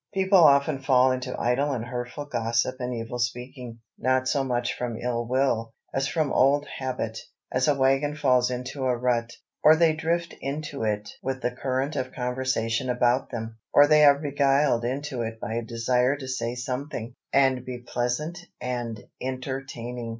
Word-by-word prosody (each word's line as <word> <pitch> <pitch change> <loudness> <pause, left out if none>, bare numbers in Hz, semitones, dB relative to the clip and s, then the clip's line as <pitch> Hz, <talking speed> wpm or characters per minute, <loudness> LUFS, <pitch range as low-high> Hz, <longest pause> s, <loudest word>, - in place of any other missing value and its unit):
People 190 0 +4
often 140 -2 +5
fall 130 -1 +4
into 130 0 -3
idle 135 +5 +1
and 120 -3 -3
hurtful 125 +3 -5
gossip 120 0 0
and 125 0 -3
evil 120 +1 -4
speaking, 120 -1 -4 0.2
not 130 +1 +1
so 140 0 +1
much 125 -2 -1
from 120 -2 -3
ill 120 0 -2
will, 120 -3 0 0.2
as 135 0 0
from 155 -1 0
old 145 +2 +4
habit, 125 -4 -3 0.3
as 130 0 +1
a 145 - +4
wagon 135 +2 +2
falls 125 -4 +3
into 125 +2 -4
a 125 -1 +1
rut. 120 -1 0 0.3
Or 155 - +7
they 160 -1 +4
drift 165 +2 -1
into 145 0 -4
it 105 -1 -1
with 130 -1 -3
the 125 - +1
current 130 +3 -2
of 130 - -3
conversation 125 -1 -1
about 125 +1 +2
them. 115 -2 -6
Or 145 - +8
they 150 0 +5
are 140 -1 +7
beguiled 140 -3 +2
into 135 0 -3
it 115 -1 -4
by 115 -1 -4
a 115 - -1
desire 125 +3 +1
to 135 -2 -8
say 120 -2 -2
something, 125 -1 -4 0.2
and 135 -2 +3
be 125 -1 -5
pleasant 125 +8 -2 0.2
and 120 -3 -3 0.2
entertaining. 130 -2 -5
130 Hz, 170 wpm, -26 LUFS, 120-140 Hz, 0.3 s, Or